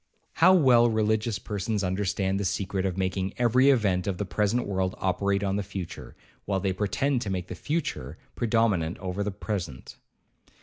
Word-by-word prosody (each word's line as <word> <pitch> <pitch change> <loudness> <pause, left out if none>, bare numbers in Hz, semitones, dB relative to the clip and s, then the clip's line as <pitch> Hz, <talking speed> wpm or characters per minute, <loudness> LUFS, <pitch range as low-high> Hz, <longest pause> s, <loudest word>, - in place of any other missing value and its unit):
How 185 +3 +8
well 125 -8 +5
religious 110 0 +1
persons 105 +1 -3
understand 95 +1 0
the - - -1
secret 95 0 -1
of 95 -1 -4
making 95 0 -2
every 125 +3 +4
event 100 -9 +2
of 95 -3 -1
the 105 - -2
present 105 +5 0
world 95 -2 -1
operate 100 +1 0
on 100 0 0
the - - 0
future, 95 -3 -7 0.3
while 100 -1 0
they 95 0 0
pretend 120 +7 0
to 105 - -3
make 90 -1 -3
the - - -4
future 90 - -3 0.2
predominate 110 -8 +1
over 95 +1 -3
the 105 - -1
present. 95 - -5
100 Hz, 170 wpm, -27 LUFS, 95-110 Hz, 0.3 s, How